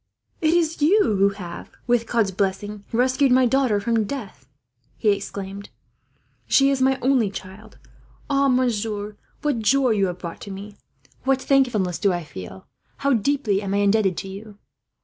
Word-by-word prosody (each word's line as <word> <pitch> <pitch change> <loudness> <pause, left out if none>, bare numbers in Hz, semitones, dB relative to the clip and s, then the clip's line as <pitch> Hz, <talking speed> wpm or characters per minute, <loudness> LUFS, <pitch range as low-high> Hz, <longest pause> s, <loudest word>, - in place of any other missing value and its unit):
"It 320 +1 +3
is 330 -2 0
you 360 +9 +5 0.2
who 200 +1 +4
have, 180 -4 -8 0.2
with 240 -2 +1
God's 225 -5 +1
blessing, 200 +2 -2
rescued 255 +3 +2
my 255 0 +5
daughter 250 -4 +2
from 225 +1 0
death," 200 - -7 0.5
he 215 - +1
exclaimed. 200 0 -5 0.8
"She 275 0 +4
is 270 -1 0
my 265 0 +3
only 255 -5 +3
child. 195 +3 -10 0.5
Oh, 275 -1 +2
monsieur, 220 -5 -1 0.3
what 290 -5 0
joy 260 +4 +3
have 215 - +1
you 190 -2 +1
brought 175 -1 -8
to - - -8
me, 200 +1 -8 0.5
what 270 0 +2
thankfulness 245 -11 +1
do 200 -2 +2
I 175 -1 -2
feel, 95 - -10 0.3
how 280 0 +1
deeply 230 -3 +1
am 200 -1 -2
I 200 - +2
indebted 200 -3 +2
to 180 - -5
you! 200 +2 -10
215 Hz, 165 wpm, -23 LUFS, 195-260 Hz, 0.8 s, you